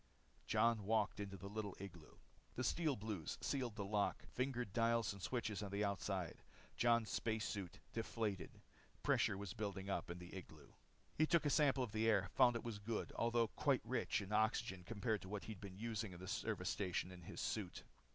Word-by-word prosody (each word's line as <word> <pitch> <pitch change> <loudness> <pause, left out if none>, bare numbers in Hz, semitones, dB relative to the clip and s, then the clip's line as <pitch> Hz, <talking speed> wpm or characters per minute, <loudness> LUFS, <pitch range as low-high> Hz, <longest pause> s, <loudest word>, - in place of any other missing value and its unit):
Jon 110 0 +4
walked 110 0 +2
into 100 -1 -4
the 100 - -7
little 105 -1 -4
igloo. 90 -5 -9 0.4
The 130 - -1
Steel 155 +2 +2
Blues 105 -7 -3
sealed 125 -6 -1
the 100 -2 -2
lock, 105 0 +1
fingered 125 -5 -1
dials 115 -2 +3
and 100 - -10
switches 110 -2 -1
on 100 - -3
the 100 +2 0
outside. 95 -2 -2 0.3
Jon's 115 -2 +4
space 110 -1 0
suit 100 -5 -4 0.2
deflated. 110 -3 -1 0.5
Pressure 100 - +3
was 100 -1 -4
building 100 -3 -3
up 85 -3 -1
in 85 - -4
the 90 +1 -9
igloo. 80 -6 -9 0.5
He 155 - +6
took 170 -2 +4
a 145 - +3
sample 140 -3 +4
of 120 - -3
the 110 +1 +2
air, 100 -3 +3
found 120 -1 +6
that 115 - -1
it - - -14
was 115 -3 -3
good, 110 +2 -2
although 115 -1 +3
quite - - +2
rich - - +1
in 100 - -8
oxygen 105 -4 +2
compared 110 +1 -1
with 95 - -8
what 105 -1 -3
he'd 110 -4 -7
been 95 -2 -7
using 110 -2 -2
in 85 - -9
the 95 - -7
service 100 -2 -1
station 95 -2 -1
and 90 -1 -9
in 80 - -10
his - - -6
suit. - - -2
105 Hz, 200 wpm, -41 LUFS, 95-115 Hz, 0.5 s, He